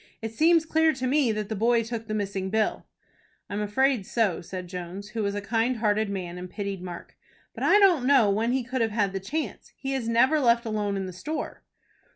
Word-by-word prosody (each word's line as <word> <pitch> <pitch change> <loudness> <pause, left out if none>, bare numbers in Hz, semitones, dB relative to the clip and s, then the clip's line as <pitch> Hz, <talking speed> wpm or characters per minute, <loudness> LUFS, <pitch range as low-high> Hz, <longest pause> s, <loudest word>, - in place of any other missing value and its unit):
"It 225 0 -5
seems 325 +4 +4
clear 320 0 +3
to 260 -1 -4
me 265 -2 +2
that 215 -1 -3
the 220 - -3
boy 230 +2 +2
took 225 0 -5
the 215 - -2
missing 195 -2 -2
bill." 220 +1 0 0.6
"I - - -4
am 205 - -1
afraid 250 +2 +1
so," 215 -7 +1
said 180 +1 -6
Jones, 180 +3 -7
who 220 +1 -3
was 200 -1 -1
a 205 - -2
kind 230 +4 0
hearted 215 -1 +1
man, 180 -3 -5
and 180 0 -7
pitied 200 -1 -4
Mark. 175 -1 -8 0.4
"But - - -6
I - - +6
don't 355 -11 +4
know 270 -6 +5
when 225 +4 +1
he 260 0 0
could 255 +1 -3
have 225 - +2
had 205 -3 0
the 195 - -2
chance. 295 +12 -5
He 270 0 -3
is 245 -4 -2
never 255 +7 +4
left 235 -3 +3
alone 210 -2 -1
in 190 - -3
the 185 - -7
store." 295 - -5
220 Hz, 225 wpm, -26 LUFS, 200-255 Hz, 0.6 s, I